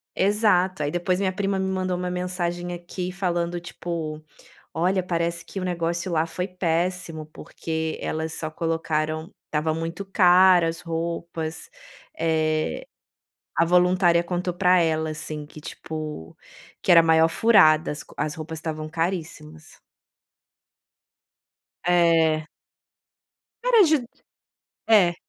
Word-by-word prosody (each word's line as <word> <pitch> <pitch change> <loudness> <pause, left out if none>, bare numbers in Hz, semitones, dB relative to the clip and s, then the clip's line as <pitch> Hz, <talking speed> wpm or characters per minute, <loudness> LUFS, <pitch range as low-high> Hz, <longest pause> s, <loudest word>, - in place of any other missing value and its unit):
Exato, 190 -4 +2
aí 145 - -1
depois 175 +2 0
minha 195 -1 +1
prima 195 0 -1
me 190 - -1
mandou 185 -1 -1
uma 180 0 -3
mensagem 175 -1 -3
aqui 175 +1 -5
falando, 175 -2 -2
tipo: 165 -3 -5 0.5
"Olha, 185 +3 +1
parece 170 -1 -2
que - - -7
o 185 - -3
negócio 170 0 -2
lá 160 0 +1
foi 180 +2 -3
péssimo, 175 -2 -2
porque 160 +1 -5
elas 160 0 -3
só 155 - -4
colocaram 160 0 -2 0.2
tava 155 +1 0
muito 165 +4 -4
cara 185 -2 +5
as 165 +1 -4
roupas", 165 -1 -4 0.5
eh, 155 - 0 0.7
a 165 - +3
voluntária 180 0 +4
contou 180 +1 -2
pra 180 0 +4
ela, 160 -1 0
assim, 155 -1 -6
que, 155 - -13
tipo, 155 - -7 0.5
que - - +2
era 170 - +9
a - - +5
maior 160 0 +5
furada 175 -7 +5
as 150 - -5
co - - -18
as 150 +1 -1
roupas 160 0 -6
estavam 155 -1 -5
caríssimas. 160 -2 -5 2.1
É. 165 -3 +3 1.2
Caras 465 -8 +5
de 310 - +4
d 245 - -8 0.8
é. 195 -6 +5
170 Hz, 130 wpm, -24 LUFS, 160-180 Hz, 2.1 s, era